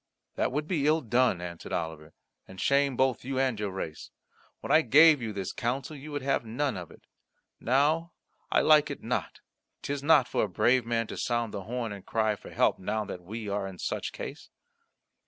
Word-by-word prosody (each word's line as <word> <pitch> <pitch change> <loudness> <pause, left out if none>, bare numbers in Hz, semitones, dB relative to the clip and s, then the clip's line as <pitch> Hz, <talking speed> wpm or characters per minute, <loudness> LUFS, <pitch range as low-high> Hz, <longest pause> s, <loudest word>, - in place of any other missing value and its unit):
"That - - 0
would 150 +3 -2
be 155 -6 0
ill 155 +1 +3
done," 120 - +2
answered 85 -1 -7
Oliver, 80 -2 -4 0.3
"and 95 - -12
shame 140 +2 +2
both 130 -2 +1
you 130 +1 -3
and 130 -4 +1
your 105 -1 -2
race. 95 -5 -6 0.5
When - - -5
I 160 - +7
gave 150 +2 +6
you 110 -2 -3
this 95 -2 -4
counsel 130 +5 -3
you 150 +2 -9
would 145 -2 -4
have 135 -2 +1
none 125 +3 -2
of 90 -3 -7
it. - - -17 0.6
Now 155 +7 +1 0.4
I - - +4
like 155 -1 +5
it - - -7
not. - - -3 0.4
'Tis 140 0 -3
not 145 -3 +5
for - - 0
a - - -7
brave 120 +6 +2
man 115 -1 0
to - - -8
sound 120 -2 -1
the 100 -3 -5
horn 120 -1 -3
and 100 -2 -8
cry 110 -1 0
for - - -13
help - - +2
now 105 +3 -2
that 90 - -7
we 105 +4 -7
are 100 -1 -2
in 95 -1 -9
such - - -3
case." - - -8
120 Hz, 205 wpm, -28 LUFS, 100-140 Hz, 0.6 s, I